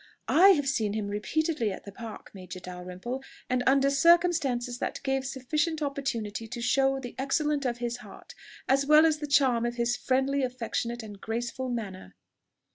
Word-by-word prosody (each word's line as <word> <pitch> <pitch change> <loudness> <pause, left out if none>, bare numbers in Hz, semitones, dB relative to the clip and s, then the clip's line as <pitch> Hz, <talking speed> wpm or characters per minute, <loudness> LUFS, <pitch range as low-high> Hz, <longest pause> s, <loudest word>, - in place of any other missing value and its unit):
"I 370 +5 +7
have 290 -3 -1
seen 220 -6 0
him 210 -2 -2
repeatedly 230 - -1
at - - -8
the 200 - -8
Park, 225 +1 -9
Major 185 -2 -9
Dalrymple, 180 +7 -6 0.3
and 255 0 +2
under 275 +1 +4
circumstances 280 -6 +3
that - - -3
gave 270 -1 -1
sufficient 300 +4 -1
opportunity 235 -6 -3
to 240 +2 -6
show 270 +2 +2
the 245 -2 -7
excellence 290 +1 0
of 240 -1 -1
his 240 0 -3
heart, 245 - -13 0.3
as 275 +1 +2
well 305 +1 +7
as 310 -2 +2
the 300 - -4
charm 265 -5 +3
of 240 0 -1
his 240 0 +1
friendly, 265 +2 +1
affectionate, 240 -2 -3
and 205 -2 -10
graceful 240 +3 -3
manner." 195 - -5
255 Hz, 170 wpm, -28 LUFS, 230-275 Hz, 0.3 s, I